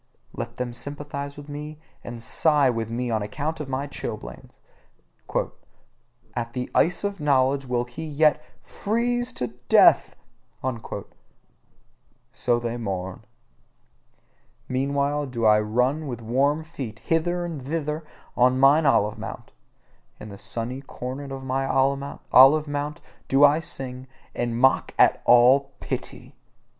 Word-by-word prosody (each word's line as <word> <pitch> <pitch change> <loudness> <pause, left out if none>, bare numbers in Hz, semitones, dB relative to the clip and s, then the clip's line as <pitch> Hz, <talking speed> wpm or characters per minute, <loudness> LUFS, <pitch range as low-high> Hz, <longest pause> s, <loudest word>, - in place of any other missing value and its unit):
Let 115 0 -6
them 125 -1 -4
sympathise 140 +2 -6
with 145 0 -10
me 150 +1 -7 0.3
and 120 -1 -7
sigh 145 +1 +3
with 115 -2 -3
me 120 +1 -2
on 110 -1 0
account 150 +10 -3
of 150 -3 -5
my 135 +1 -2
chilblains: 115 -6 -8 1.8
"At 120 0 -3
the 125 -1 -4
ice 175 +3 +2
of 200 -1 -2
knowledge 140 -2 +2
will 120 -1 0
he 125 +6 -8
yet 155 0 +2 0.2
FREEZE 240 +3 -1
TO 125 - -4 0.2
DEATH!" - - +6 2.2
so 120 -2 +1
they 120 0 -3
mourn. 95 -2 -5 1.4
Meanwhile 140 +2 0
do 120 -3 -2
I 105 0 +6
run 125 +8 0
with 120 -3 -6
warm 140 +7 +1
feet 135 -9 -7
hither 175 +5 0
and 160 -6 -6
thither 150 +2 -3 0.3
on 125 +1 +3
mine 145 +3 +5
olive 105 -5 +2
mount: - - -8 0.7
in 105 - -9
the 100 - -9
sunny 115 +5 -4
corner 135 +1 -7
of 135 0 -6
mine 135 +1 -1 0.6
olive 150 +4 +7
mount 145 +2 -4 0.3
do 135 +2 +4
I 145 +2 +4
sing, 130 -4 -5 0.3
and 120 -1 -2
mock 130 +1 +3
at - - +4
all 130 +3 +5
pity. - - -6
135 Hz, 130 wpm, -24 LUFS, 120-150 Hz, 2.2 s, olive